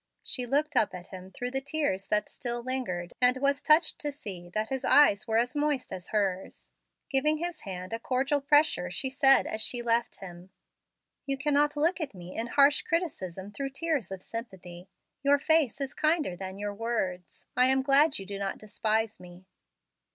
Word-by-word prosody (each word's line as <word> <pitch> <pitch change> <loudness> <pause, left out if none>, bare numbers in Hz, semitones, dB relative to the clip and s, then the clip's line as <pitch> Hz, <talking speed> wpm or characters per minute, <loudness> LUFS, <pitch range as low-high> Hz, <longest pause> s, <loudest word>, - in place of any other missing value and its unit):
She 250 -3 -1
looked 295 +4 +1
up 215 -6 +2
at 180 0 -10
him 185 0 -10
through 245 +5 -5
the 270 +1 -1
tears 280 -9 -1
that 210 0 +1
still 240 -1 -3
lingered, 210 -10 -3
and 250 +1 +5
was 280 +1 +1
touched 310 +3 +3
to 295 -3 -2
see 190 -11 -8
that 215 +4 -2
his 265 -1 -3
eyes 215 -8 +5
were 220 0 +1
as 245 +5 0
moist 295 -5 -1
as 185 -1 -6
hers. 195 -3 -2 0.4
Giving 300 +3 +2
his 340 -1 -4
hand 185 0 -6
a 225 - -2
cordial 270 +4 0
pressure, 290 - +3
she 260 +9 -2
said 270 0 +5
as 215 - -4
she 240 +2 -1
left 235 0 +1
him: 180 -1 -11 0.8
"You 275 0 -1
cannot 295 +1 +1
look 330 +4 +1
at 295 -9 -4
me 180 0 -10
in 230 - -2
harsh 280 +3 +4
criticism 205 - -3
through 275 +6 -4
tears 275 - -2
of 190 -1 -6
sympathy. 185 -6 -8 0.3
Your 285 0 +4
face 310 -3 +2
is 275 -1 -3
kinder 310 - +1
than 190 +1 -7
your 205 0 -4
words. 200 -5 -4
I 250 0 +5
am 265 0 +2
glad 280 +2 +4
you 195 - -7
do 200 0 -6
not 195 -1 -3
despise 220 +1 -1
me." 180 +1 -14
245 Hz, 190 wpm, -28 LUFS, 195-285 Hz, 0.8 s, and